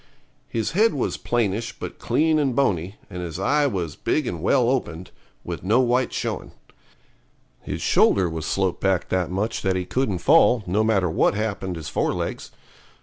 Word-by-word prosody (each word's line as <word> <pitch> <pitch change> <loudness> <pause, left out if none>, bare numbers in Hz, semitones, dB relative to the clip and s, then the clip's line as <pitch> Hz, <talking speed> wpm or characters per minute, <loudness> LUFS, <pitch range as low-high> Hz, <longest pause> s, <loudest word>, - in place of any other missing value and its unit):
His 115 -2 -2
head 215 +1 +3
was 135 - -1
plainish, 115 -1 -1
but - - -7
clean 155 0 +2
and 135 -4 0
bony, 95 -8 0
and 90 - -7
his 85 -2 -5
eye 145 +8 +2
was 90 - -3
big 150 - -1
and 85 -8 -4
well 125 +6 +3
opened, 90 -9 -2 0.3
with - - -5
no 110 +6 +3
white 125 0 +2
showing. - - -4 1.1
His - - -5
shoulder 95 -3 +4
was 80 -2 -4
sloped 95 -2 -1
back 95 -2 +1
that 90 -2 0
much 100 +5 -2
that 95 -1 0
he 90 -1 -2
couldn't 125 -3 -1
fall, 125 - +4
no 100 +5 +1
matter 105 -5 +2
what 80 - +2
happened 100 -4 -3
his 80 -2 -7
fore - - 0
legs. - - -4
100 Hz, 175 wpm, -23 LUFS, 90-125 Hz, 1.1 s, shoulder